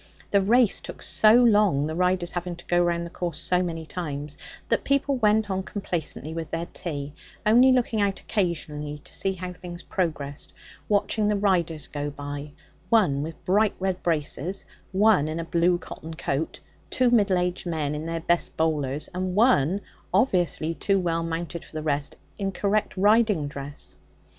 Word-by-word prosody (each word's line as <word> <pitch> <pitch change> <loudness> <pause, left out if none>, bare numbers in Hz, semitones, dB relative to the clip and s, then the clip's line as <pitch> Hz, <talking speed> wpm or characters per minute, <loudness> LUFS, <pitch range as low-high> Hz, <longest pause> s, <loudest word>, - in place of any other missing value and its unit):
The 200 - +4
race 230 +2 +3
took - - -8
so 215 +1 +5
long, 205 -11 +4
the 155 - -3
riders 180 0 +1
having 175 0 -3
to 175 - -14
go 175 0 +3
round 170 0 0
the 170 - -8
course 170 -4 -3
so 180 +2 +1
many 165 -3 -3
times, 150 -4 -5 0.3
that - - +2
people 280 0 +1
went 215 -2 +3
on 190 0 0
complacently 175 -5 -4
with 165 -1 -5
their 165 +1 -2
tea, 145 -4 -5 0.3
only 245 +5 +6
looking 240 -4 +2
out 200 -1 +1
occasionally 150 -7 -2
to - - -11
see 195 - 0
how 180 0 -6
things 175 -1 -9
progressed, 145 -6 -3 0.4
watching 210 +1 +2
the 210 - +2
riders 175 -6 +1
go 145 0 -4
by 145 0 -6 0.4
one 180 -12 +3
with 160 +2 -7
bright 205 +3 +3
red 185 -1 -1
braces, 170 +3 -1 0.3
one 195 -5 +4
in 155 +1 -3
a 165 - -3
blue 175 +1 +2
cotton 160 -2 -9
coat, 155 0 -2 0.3
two 255 -2 +2
middle 205 -5 +4
aged 180 0 -1
men 155 -4 -1
in 150 +2 -4
their 165 0 -2
best 170 +1 0
bowlers, 150 -3 0
and 185 0 -2
one, 200 - +4 0.3
obviously 180 -6 +2
too 195 +4 +1
well 170 -3 0
mounted 165 0 -4
for - - -17
the 155 0 -4
rest, 145 -2 -1 0.2
in 195 -1 -1
correct 200 +1 0
riding 210 -5 +4
dress. 140 0 -7
175 Hz, 170 wpm, -25 LUFS, 155-200 Hz, 0.4 s, only